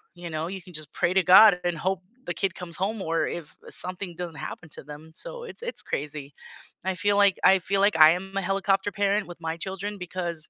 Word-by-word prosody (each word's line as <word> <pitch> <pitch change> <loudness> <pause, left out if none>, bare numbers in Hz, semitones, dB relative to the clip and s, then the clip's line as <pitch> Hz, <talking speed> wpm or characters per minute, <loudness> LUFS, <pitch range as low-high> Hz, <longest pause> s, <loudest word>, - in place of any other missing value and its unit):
you 175 -1 -7
know? 155 +1 -3
You 190 +1 -6
can 180 -1 -14
just 155 -1 -6
pray 175 0 +1
to 190 -1 +4
God 185 +1 +8
and 175 -2 -1
hope 190 +3 -1 0.2
the - - -2
kid 195 - -1
comes 170 -3 -7
home, 200 +2 -2
or 165 -1 0
if, 165 -3 -6
eh, - - -8
something 180 -1 -5
doesn't 170 -3 -6
happen 160 - -7
to - - -8
them, 150 +3 -11
so - - -7
it's 475 - -10
it's 485 - -4
crazy. 145 0 -5 0.5
I 190 0 -1
feel 205 +2 +1
like 200 -2 +5
I 190 0 +7
feel 195 +2 0
like 200 -3 +4
I 155 0 +9
am 195 +3 -4
a - - +1
helicopter 195 +1 +1
parent 200 +1 +1
with 175 -1 -10
my 160 0 -2
children 195 +3 -5
because 175 -3 -5
180 Hz, 235 wpm, -26 LUFS, 165-195 Hz, 0.5 s, I